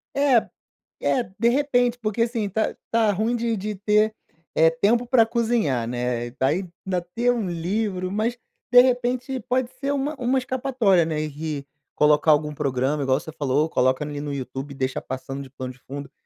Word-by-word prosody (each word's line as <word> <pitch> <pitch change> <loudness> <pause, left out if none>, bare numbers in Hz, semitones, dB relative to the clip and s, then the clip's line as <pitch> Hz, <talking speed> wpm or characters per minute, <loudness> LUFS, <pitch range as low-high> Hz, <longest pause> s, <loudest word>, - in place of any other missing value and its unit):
É 275 -5 +3 0.6
é 255 - +2 0.2
de 235 +2 +4
repente, 245 -2 +2
porque, 220 0 -1
assim, 230 -3 -1
tá 220 +3 -1 0.2
tá 225 -2 +3
ruim 220 +5 0
de 230 -1 -1
de 210 +2 -4
ter 210 +2 +2 0.4
é 160 0 +5
tempo 215 +9 +1
para 235 -2 +5
cozinhar, 225 - 0
né, 120 0 -2
daí 150 +9 0 0.2
ainda 185 -2 0
ter 245 +1 +3
um 230 -5 -1
livro, 185 +2 -2
mas 220 +4 -1 0.3
de 245 0 +10
repente 250 +1 0
pode 255 0 +1
ser 280 0 -1
uma 285 +2 -1
uma 250 +2 +1
escapatória, 250 -8 +2
né, 155 -1 -2
e 150 -1 -4 0.3
colocar 150 +1 +4
algum 150 0 +2
programa 140 0 -1
igual 135 0 +2
você 160 - -9
falou: 145 0 +1
"Coloca 130 -1 +2
ali 145 -1 -5
no 145 0 -4
YouTube 135 +1 -5
e - - -12
deixa 130 -1 -2
passando 135 +1 -6
de 135 - -10
plano 130 -1 -7
de 125 - -23
fundo," 140 +1 -8
190 Hz, 180 wpm, -24 LUFS, 145-240 Hz, 0.6 s, de